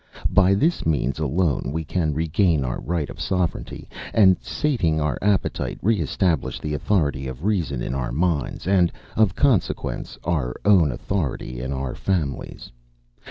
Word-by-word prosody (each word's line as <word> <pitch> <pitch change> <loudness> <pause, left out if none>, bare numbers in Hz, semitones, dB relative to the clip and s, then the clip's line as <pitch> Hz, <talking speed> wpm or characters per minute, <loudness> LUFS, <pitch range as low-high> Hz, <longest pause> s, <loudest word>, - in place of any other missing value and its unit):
By 100 -1 +5
this 160 - +1
means 75 -3 0
alone 75 -1 0
can 85 -3 0
we 75 +2 -1
regain 80 -2 +2
our - - -3
right 85 -3 -2
of - - -9
sovereignty 90 -3 -2 0.3
and, 95 -4 +6
sating 100 - 0
our 75 -4 -1
appetite, 100 -1 0
re 110 +1 +3
establish 80 0 0
the 75 - -4
authority 75 -5 0
of 65 +6 -7
reason 85 - 0
in - - -3
our 65 -3 -2
minds, 80 +1 -1
and, 90 -2 +3 0.2
of 110 -4 +3
consequence, 125 -11 0
our 70 -8 -1
own 90 -8 +5
authority 70 -4 -3
in 65 +2 -4
our 65 -2 -3
families. 85 -8 -3
80 Hz, 150 wpm, -23 LUFS, 70-95 Hz, 0.3 s, and